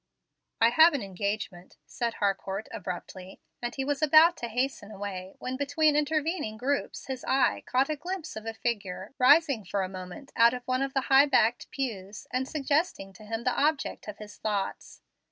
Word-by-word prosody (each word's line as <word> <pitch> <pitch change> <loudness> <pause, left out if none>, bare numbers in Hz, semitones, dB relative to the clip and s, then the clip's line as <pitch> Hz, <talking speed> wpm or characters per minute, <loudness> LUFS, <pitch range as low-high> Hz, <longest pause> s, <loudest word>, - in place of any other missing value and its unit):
"I 230 - +6
have 320 +4 +6
an 275 - -2
engagement," 195 -1 -4
said 235 -2 -3
Harcourt, 195 +1 -2
abruptly; 185 +1 -7 0.2
and 240 0 -4
he 270 - -2
was 290 +1 -1
about 315 +3 +7
to 235 - -4
hasten 245 -2 -2
away, 195 -2 -6
when 255 +1 -4
between 290 +2 +2
intervening 300 -5 0
groups 275 +5 -2
his 265 -1 -5
eye 265 0 +2
caught 260 +2 +2
a 310 - -1
glimpse 355 +2 -6
of 220 +1 -7
a 225 - -3
figure 205 -3 -3
rising 280 -2 +5
for 195 +1 -2
a - - -2
moment 185 +8 -9
out 235 +1 +5
of 250 - -7
one 255 +1 -1
of 275 0 -2
the 270 - +3
high 270 +2 +5
backed 240 -3 +2
pews, 210 -7 -5
and 260 +1 0
suggesting 285 - -1
to 215 +3 -14
him 225 +2 -4
the 255 - +2
object 295 -4 0
of 210 - -7
his 210 -1 -11
thoughts. 205 -3 -3
245 Hz, 185 wpm, -28 LUFS, 205-280 Hz, 0.2 s, about